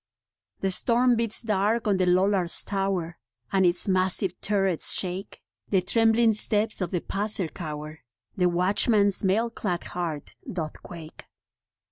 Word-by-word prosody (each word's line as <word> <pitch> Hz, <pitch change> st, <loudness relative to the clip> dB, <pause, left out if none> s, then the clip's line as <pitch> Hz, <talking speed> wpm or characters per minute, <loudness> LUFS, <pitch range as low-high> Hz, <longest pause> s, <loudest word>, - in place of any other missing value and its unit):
The 195 Hz, -, 0 dB
storm 240 Hz, +5 st, +2 dB
beats 230 Hz, 0 st, -1 dB
dark 215 Hz, +1 st, 0 dB
on 200 Hz, -2 st, +2 dB
the 185 Hz, -1 st, 0 dB
Lollard's 185 Hz, -1 st, +2 dB
Tower, 195 Hz, -4 st, -3 dB, 0.3 s
And 190 Hz, -2 st, +3 dB
its 175 Hz, +2 st, +2 dB
massive 185 Hz, 0 st, 0 dB
turrets 195 Hz, -4 st, +2 dB
shake; 185 Hz, +1 st, -3 dB, 0.3 s
The 190 Hz, -3 st, +1 dB
trembling 225 Hz, +2 st, +3 dB
steps 215 Hz, 0 st, +2 dB
of 180 Hz, -, -2 dB
the 175 Hz, -1 st, -2 dB
passer 205 Hz, -2 st, -1 dB
cower, 150 Hz, -1 st, -8 dB, 0.4 s
The 180 Hz, -1 st, +2 dB
watchman's 200 Hz, +3 st, +2 dB
mail 220 Hz, +5 st, +1 dB
clad 180 Hz, -6 st, -4 dB
heart 165 Hz, -5 st, -5 dB, 0.2 s
doth 160 Hz, -4 st, -6 dB
quake. 165 Hz, -2 st, -11 dB
190 Hz, 135 wpm, -25 LUFS, 175-210 Hz, 0.4 s, And